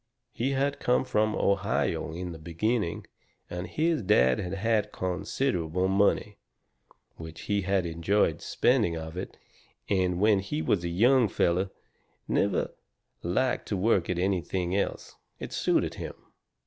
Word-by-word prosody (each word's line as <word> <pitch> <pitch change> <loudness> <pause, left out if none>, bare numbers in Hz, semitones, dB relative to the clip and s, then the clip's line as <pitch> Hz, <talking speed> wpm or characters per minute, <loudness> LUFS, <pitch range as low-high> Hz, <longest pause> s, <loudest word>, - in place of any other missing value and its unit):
He 135 +4 -1
had 140 +1 0
come 125 +1 +2
from 110 -2 +1
Ohio 95 -5 0
in 90 +2 -5
the 80 - -9
beginning, 85 +4 -1 0.5
and 90 0 -4
his 160 - 0
dad 65 - +4
had 90 +1 -3
had 105 +1 +1
considerable 90 - -1
money. 100 +1 +1 0.8
Which 80 0 -9
he 100 -1 0
had 95 -1 +1
enjoyed 85 +1 +1
spending 110 -10 +2
of 80 +1 -7
it, 90 - -6 0.5
and 90 -3 +1
when 105 0 +4
he 95 -5 -3
was 85 +2 +1
a 85 - -2
young 120 +7 +4
feller 90 0 +1 0.6
never - - +1 0.5
liked 125 +9 0
to 100 - -1
work 95 -3 +2
at 90 - 0
nothing 90 -1 -1
else. 100 - -2 0.2
It - - -7
suited - - +1
him. - - -6
95 Hz, 140 wpm, -28 LUFS, 85-110 Hz, 0.8 s, dad